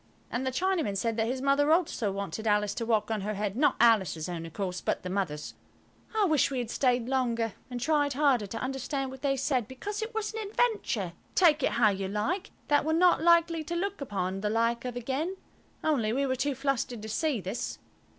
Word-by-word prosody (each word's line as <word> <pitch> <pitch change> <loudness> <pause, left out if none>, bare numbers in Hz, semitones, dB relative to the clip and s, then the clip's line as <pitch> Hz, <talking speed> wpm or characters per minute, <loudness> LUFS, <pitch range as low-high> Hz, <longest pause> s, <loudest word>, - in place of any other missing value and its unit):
And 260 +2 -2
the - - 0
Chinaman 330 - 0
said 230 +3 0
that 225 0 +1
his 255 +2 -2
mother 285 +2 +3
also 310 - +2
wanted 200 +2 -4
Alice 210 -1 +2
to 230 +1 -4
walk 220 -1 +1
on 215 -2 -1
her 210 +2 -3
head–not 210 +8 +1
Alice's 190 -9 +3
own, 170 -2 -5
of 165 - -13
course, 185 -3 -3
but - - -1
the 180 - -4
mother's. 170 -7 -2 0.6
I 430 -2 +4
wished 310 -6 +3
we 270 - -3
had 240 -2 -3
stayed 245 -3 +1
longer, 235 -4 0 0.2
and 245 -1 -4
tried 290 +1 +2
harder 260 -6 +2
to 225 - -6
understand 270 +2 -3
what 265 0 -10
they 275 -1 +1
said, 260 -4 0
because 405 +12 -5
it 440 +1 -5
was 440 0 -2
an 435 -2 -4
adventure, 405 - 0 0.2
take 315 -5 +5
it - - +1
how 230 -2 +4
you 195 -1 -3
like, 220 - -2 0.2
that 290 0 +3
we're 315 +1 0
not 350 0 +4
likely 335 -1 +4
to 340 +3 -4
look 395 0 -2
upon 195 -6 -2
the 210 - 0
like 230 +2 +1
of 250 -1 -4
again 275 +10 -2 0.5
Only 255 -9 +1
we 275 +2 +1
were 260 -1 0
too 280 +2 -1
flustered 255 -4 -2
to - - -5
see 285 +3 0
this. 190 +5 -4
255 Hz, 215 wpm, -29 LUFS, 215-300 Hz, 0.6 s, take